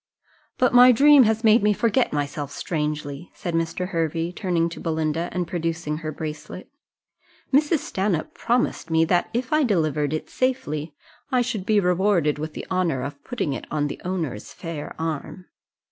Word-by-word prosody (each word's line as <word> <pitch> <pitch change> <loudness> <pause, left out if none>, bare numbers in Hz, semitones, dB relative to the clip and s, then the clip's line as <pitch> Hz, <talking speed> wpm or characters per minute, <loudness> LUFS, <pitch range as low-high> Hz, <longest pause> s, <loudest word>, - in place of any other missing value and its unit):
"But 250 -1 +2
my 250 +1 +9
dream 280 +1 +7
has 220 +1 +1
made 220 0 +6
me 210 +1 +3
forget 230 +3 +1
myself 145 -1 -3
strangely," 150 0 -3
said 175 - -4
Mr. 165 +2 -1
Hervey, 165 -1 -1
turning 175 -3 0
to 170 - -9
Belinda, 160 +1 -1
and 180 -2 -2
producing 165 -3 -2
her 155 -1 -5
bracelet: 155 - -7 0.8
"Mrs. 300 +2 +3
Stanhope 190 -5 -1
promised 240 -7 -1
me 160 0 +3
that 175 +1 +1
if 245 +4 -2
I 305 - +4
delivered 155 - +1
it 155 - -3
safely, 155 - -2 0.4
I 250 -1 +3
should 220 -6 -4
be 215 -1 +4
rewarded 180 -5 +2
with 155 0 -5
the - - -6
honour 170 -8 0
of 140 +1 -7
putting 230 - -2
it 125 - -6
on 150 -1 0
the - - -7
owner's 165 - -4
fair 165 -4 -7
arm." 160 +3 -4
170 Hz, 165 wpm, -24 LUFS, 155-210 Hz, 0.8 s, my